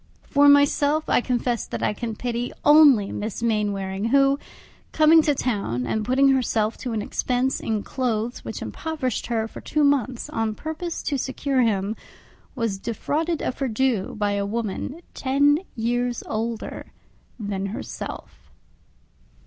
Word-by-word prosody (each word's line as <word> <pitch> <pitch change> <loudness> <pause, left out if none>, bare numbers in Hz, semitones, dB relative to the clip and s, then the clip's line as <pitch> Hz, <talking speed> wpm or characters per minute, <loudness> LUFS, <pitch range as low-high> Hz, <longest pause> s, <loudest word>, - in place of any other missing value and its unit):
For 285 0 +4
myself, 285 +2 +4
I - - +4
confess 245 -1 -1
that - - -4
I - - +1
can 225 +1 -4
pity 240 +1 -3
only 290 -9 +7
Miss 215 +2 -4
Mainwaring; 205 -3 -1
who, 275 +3 +3 0.5
coming 320 +1 +6
to 295 -2 +1
town, 200 - -1
and 220 - -1
putting 265 +4 +3
herself 230 -4 +1
to 245 -3 -4
an 215 -2 -1
expense 255 +4 0
in 215 -2 -2
clothes 240 -2 -2
which - - -6
impoverished 300 -7 -3
her 225 -2 -1
for - - -10
two 300 -2 +2
years, 260 -3 0
on 225 -1 -1
purpose 320 +4 -5
to 285 -3 -1
secure 265 0 0
him, 210 -2 +1 0.6
was 225 -5 -2
defrauded 300 - -2
of - - -3
her 270 - 0
due 235 -3 0
by 205 -1 0
a 200 0 0
woman 230 - -3
ten 285 +3 +3 0.2
years 245 +1 -1
older 225 +1 -4 0.5
than 200 -2 -3
herself. 200 - -7
245 Hz, 145 wpm, -24 LUFS, 215-280 Hz, 0.6 s, only